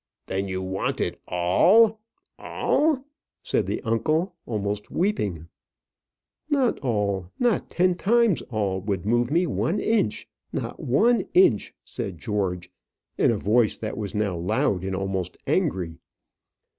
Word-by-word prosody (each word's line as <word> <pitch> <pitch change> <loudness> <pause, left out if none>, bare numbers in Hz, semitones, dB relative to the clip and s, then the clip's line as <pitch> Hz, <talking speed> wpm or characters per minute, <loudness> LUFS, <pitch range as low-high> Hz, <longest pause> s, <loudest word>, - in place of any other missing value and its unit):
"Then 95 +1 -2
you 95 0 -3
want 95 +1 -2
it - - -2
all 195 - +4 0.4
all!" 295 -3 +1 0.4
said - - 0
the - - -3
uncle, 155 - 0
almost 105 -2 -3
weeping. 105 - -1 1.0
"Not 275 -5 +2
all, 100 -8 -1
nor 240 -4 +2
ten 180 +1 +1
times 220 +1 +2
all 100 -5 -1
would 100 -2 -3
move 120 +2 +2
me 170 +5 +2
one 125 - -1
inch 220 - 0 0.2
not - - -4
one 215 - +2
inch," 155 - +4
said 95 -4 -5
George, 90 -1 -2 0.5
in - - +4
a 115 - +1
voice 110 +3 +2
that 110 - -4
was 105 -2 -5
now 105 -3 0
loud, 90 +1 0
and 95 0 -2
almost 95 -2 -3
angry. 85 -3 -1
105 Hz, 130 wpm, -25 LUFS, -, 1.0 s, all